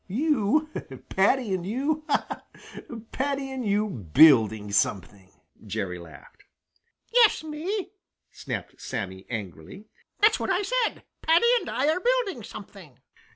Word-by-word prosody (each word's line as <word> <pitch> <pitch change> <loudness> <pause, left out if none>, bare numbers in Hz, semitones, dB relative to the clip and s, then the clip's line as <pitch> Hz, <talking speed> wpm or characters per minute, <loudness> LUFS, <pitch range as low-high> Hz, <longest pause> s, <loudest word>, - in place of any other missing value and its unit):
"You! 285 - +1 0.4
Paddy 205 +2 +2
and 185 -2 -2
you! 280 - -1
Ha, - - +2
ha! - - -11 0.2
Paddy 275 0 -2
and 260 -1 -4
you 210 0 +1
building 110 - +4
something!" 95 -1 -1 0.3
Jerry 90 -2 -4
laughed. 80 -5 -15 0.7
"Yes, 465 -8 +5
me!" 335 +7 -4 0.4
snapped - - -7
Sammy 95 -2 -5
angrily. 105 - -7 0.3
"That's 425 +1 +4
what - - -3
I 370 - +1
said; - - -1 0.2
Paddy 330 +7 +4
and - - -7
I 275 - 0
are 315 +4 +2
building 480 - 0
something." 195 - -11
215 Hz, 125 wpm, -26 LUFS, -, 0.7 s, Yes